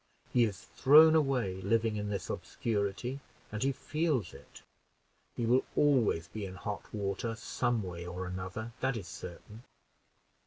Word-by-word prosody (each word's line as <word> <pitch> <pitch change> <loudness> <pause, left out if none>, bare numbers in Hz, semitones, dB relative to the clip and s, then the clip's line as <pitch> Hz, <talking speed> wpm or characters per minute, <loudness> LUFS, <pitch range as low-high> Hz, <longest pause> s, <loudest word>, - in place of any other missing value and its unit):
He 120 -1 +5
is 100 -2 -4
thrown 155 +4 +7
away, 125 -12 +1
living 110 +2 +1
in 105 0 -3
this 100 -3 -3
obscurity, 110 +4 -2 0.3
and 105 0 -4
he 135 - +3
feels 150 - -1
it. - - -14 0.7
He 120 - -1
will 125 +3 +4
always 120 - +3
be 105 +1 -6
in 95 -1 -6
hot 100 +3 -6
water 105 +2 -2
some 120 -1 -1
way 85 -1 -6
or 90 +1 -4
another, 95 +5 -5
that 130 -2 0
is 95 -5 -7
certain. 90 +5 -9
110 Hz, 150 wpm, -32 LUFS, 95-125 Hz, 0.7 s, thrown